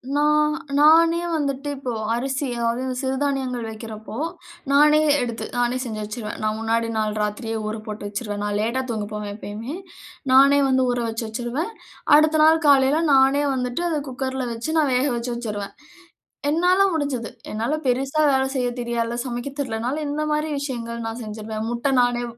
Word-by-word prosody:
நான் 300 +1 +3 0.3
நானே 330 +2 +6 0.2
வந்துட்டு 280 -1 -2
இப்போ 265 -2 -4 0.2
அரிசி 265 +3 -2 0.2
அதாவது 255 +2 -2
சிறுதானியங்கள் 265 -3 -1
வைக்கிறப்போ, 220 0 -8 0.6
நானே 300 +2 +6 0.2
எடுத்து 235 -2 -3
நானே 245 +1 +1
செஞ்சு 220 -3 -5
வச்சுருவேன். 215 0 -6
நான் 215 0 0
முன்னாடி 230 +1 0
நாள் 215 -1 0
ராத்திரியே 225 +2 -2
ஊற 215 - -3
போட்டு 210 -1 -6
வச்சுருவேன். 205 -1 -4
நான் 205 0 -1
லேட்டா 235 +4 0
தூங்க 215 -3 -2
போவேன் 210 -1 -4
எப்பயுமே. 220 +7 -6 0.6
நானே 275 +2 +7
வந்து 260 0 +3
ஊறவச்சு 230 -2 -1
வச்சுருவேன். 245 - -3 0.4
அடுத்த 310 +1 +4
நாள் 320 +1 +5
காலையில 275 +2 +5
நானே 270 +2 +5
வந்துட்டு 250 +5 -2
அத 310 -3 0
குக்கர்ல 260 0 -3
வச்சு 230 +7 -4
நான் 285 -4 +2
வேகவச்சு 245 -2 0
வச்சுருவேன். 210 -4 -5 0.8
என்னால 360 +4 +3
முடிஞ்சது. 280 -7 -2 0.2
என்னால 225 +7 -1
பெரிசா 270 +5 +1
வேலை 265 0 +2
செய்யத் 245 -1 -1
தெரியாதுல்ல. 235 0 -2
சமைக்க 245 +2 -4
தெரியல்லைனாலும், 255 +4 -2
இந்த 305 +1 -1
மாரி 300 +1 0
விஷயங்கள் 235 -4 -4
நான் 230 +2 -5
செஞ்சுருவேன். 215 +1 -5
முட்டை 240 +3 0
நானே 245 0 +1
250 Hz, 150 wpm, -23 LUFS, 225-285 Hz, 0.8 s, நானே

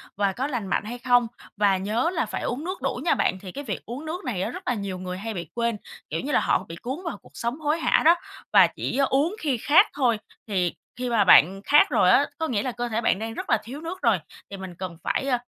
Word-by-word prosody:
và 200 -1 +1
có 260 +7 -2
lành 245 -8 -3
mạnh 190 - 0
hay 240 +3 -5
không. 245 -1 +3 0.3
Và 200 -2 +3
nhớ 215 - 0
là 330 - 0
phải - - -5
uống 255 +5 -3
nước 370 +3 -5
đủ - - -2
nha - - +4
bạn! 185 - 0
Thì 185 -3 -8
cái 285 - -6
việc 210 -9 -5
uống 255 +7 -7
nước 335 +4 -5
này 220 -8 -2
á, - - -1
rất 370 - -7
là 250 - +2
nhiều 200 -4 -4
người 185 0 -5
hay 220 +3 -5
bị 170 -5 -6
quên, 235 -2 0 0.3
kiểu 160 - -2
như 290 - -4
là, - - +4
họ 190 - +1
bị 165 - -6
cuốn 255 - -5
vào 330 - -3
cuộc - - -19
sống 235 +5 -3
hối 310 +1 0
hả - - +3
đó 335 +2 +8 0.4
và - - +8
chỉ - - -4
uống 300 +9 +1
khi 280 - 0
khát 290 +7 +5
thôi. 250 -6 +2 0.3
Thì 185 -5 0 0.2
khi 250 0 -3
mà 230 -3 +3
bạn 190 +1 +6
khát 295 +7 +6
rồi - - +4
á, - - +5
có 320 - -1
nghĩa 215 -8 -1
là 255 - -2
cơ 240 0 -4
thể 230 +1 -1
bạn 200 - +2
đang 225 0 -4
rất - - -6
là - - +4
thiếu 270 +6 -8
nước 345 +3 -6
rồi, - - +3 0.3
thì 200 - -7
mình 190 -2 -8
cần 180 -2 -6
phải, 270 - -1
ơ, 255 -2 +2
235 Hz, 275 wpm, -25 LUFS, 195-285 Hz, 0.4 s, đó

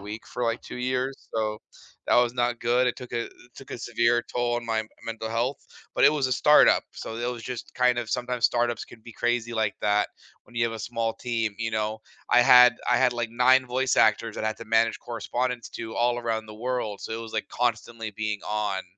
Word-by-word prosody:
week 105 +2 -8
for, 125 - -3
like, 115 0 -1
2 - - -8
years, 130 +2 -2
so 110 -1 -1 0.5
that - - +3
was 120 0 +3
not 120 -1 0
good, 120 +2 +2
it 125 - +1
took 125 -2 -9
a 120 -1 -1
it - - -12 0.2
took 135 - -10
a - - -5
severe 120 0 +1
toll 120 0 0
on 120 - -4
my 110 -1 -1 0.2
mental 115 -1 -5
health, 120 +5 -1 0.4
but - - +4
it - - +7
was 140 -4 0
a - - 0
start-up, 150 +4 +5
so 110 - -7
there 120 +1 -2
was 120 -2 -8
just, 125 0 -7
kind 125 -1 +3
of, 120 -2 -3
sometimes 125 0 -2
start-ups 120 -1 +1
can 115 - -15
be 120 - -11
crazy 120 0 -1
like 110 -2 0
that 105 0 +2 0.4
when 120 - -20
you 115 - 0
have 115 - -1
a 115 - -6
small 115 0 -2
team, 115 -2 -2
you 115 -1 -2
know. 110 0 -1 0.3
I 120 0 +6
had 125 -1 +8
I 125 - +5
had, 125 -1 +3
like, 120 -1 -3
9 130 +2 +4
voice 130 +1 0
actors 110 0 +3
that - - -3
I - - +2
had 110 - -4
to 115 - -8
manage 115 0 +2
correspondence 120 +1 -3
to 110 -1 -7
all 120 0 +2
around 115 -2 -2
the 105 - -10
world, 115 -3 -3
so - - -7
it 115 - -3
was, 115 -1 -9
like, 110 - -3
constantly 115 -2 -2
being 105 0 -3
"on." 105 -3 -1
120 Hz, 235 wpm, -26 LUFS, 110-125 Hz, 0.5 s, had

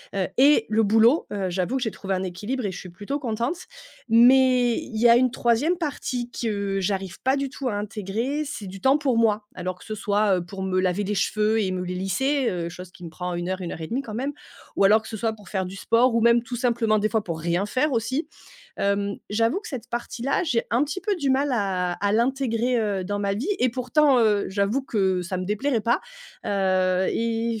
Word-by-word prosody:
heu, 190 - +1
et 280 -4 +6
le 220 +1 +3
boulot, 225 +7 +4
heu, 195 -3 -2
j'avoue 190 +9 -1
que 255 - -2
j'ai 220 - -1
trouvé 195 -1 -3
un 185 - -2
équilibre 210 +7 -4
et 195 - -1
je - - -7
suis 185 - -9
plutôt 205 +11 -5
contente, 240 +5 -2 0.5
mais 250 +1 +5
il 220 -4 -6
y 240 - +5
a 235 - +7
une 255 0 +3
3e 245 +8 +1
partie 255 -6 -3
que 200 -4 -2
j'arrive 190 -1 -3
pas 265 +2 +2
du 275 0 -1
tout 270 -2 -4
à 205 - -2
intégrer, 210 +8 -3
c'est 280 -8 -6
du 190 +1 -9
temps 270 +2 +4
pour 265 -6 0
moi. 215 -2 +2
Alors 185 0 -4
que - - -15
ce 215 - -5
soit, 205 -2 +1
heu, - - -2
pour 190 +2 -7
me 185 -1 0
laver 185 +2 0
les 205 - -2
cheveux 215 +3 +1
et 190 -2 -1
me 185 0 -2
les 180 - -4
lisser. 250 +9 0
Heu, 170 -2 -3
chose 180 +1 -10
qui 180 - -15
me - - -7
prend 180 +2 -5
1 175 +1 -3
heure, 185 0 -3
1 175 - -4
heure 165 - -7
et 160 - -5
1/2, 255 +8 -2
quand 225 -6 -9
même, 275 +4 -2 0.4
ou - - +2
alors 210 +3 +6
que - - -11
ce 220 - -6
soit 225 +1 -1
pour 205 -4 -15
faire 190 -2 -1
du 190 - -8
sport 230 +4 +2
ou 230 - +3
même 235 +1 +5
tout 240 +1 -6
simplement 235 -3 +1
des 210 - +1
fois 220 -1 0
pour 165 -4 -4
rien 170 +4 0
faire, 270 +7 +1
aussi. 260 +6 -1 0.5
Hem, 200 0 0
j'avoue 225 - +1
que 440 - -9
cette 260 -6 -6
partie 240 0 -5
là, 275 - +1
j'ai 240 -8 0
un 240 +4 +3
petit 325 +6 -5
peu 415 -2 0
du 285 -5 0
mal 275 +2 +2
à 190 -6 0
à 200 +3 -1
l'intégrer, 245 0 +1
heu, 200 -4 -1
dans 205 +2 -2
ma 200 -1 0
vie 230 +9 -3
et 255 - +3
pourtant, 255 +3 +3
heu, 210 -3 +3
j'avoue 200 +7 0
que 190 -7 0
ça 185 +1 -4
me 185 - -3
déplairait 225 +6 0
pas, 235 +1 +2 0.5
heu, 185 -2 +1
et 230 0 -1
220 Hz, 240 wpm, -24 LUFS, 195-250 Hz, 0.5 s, a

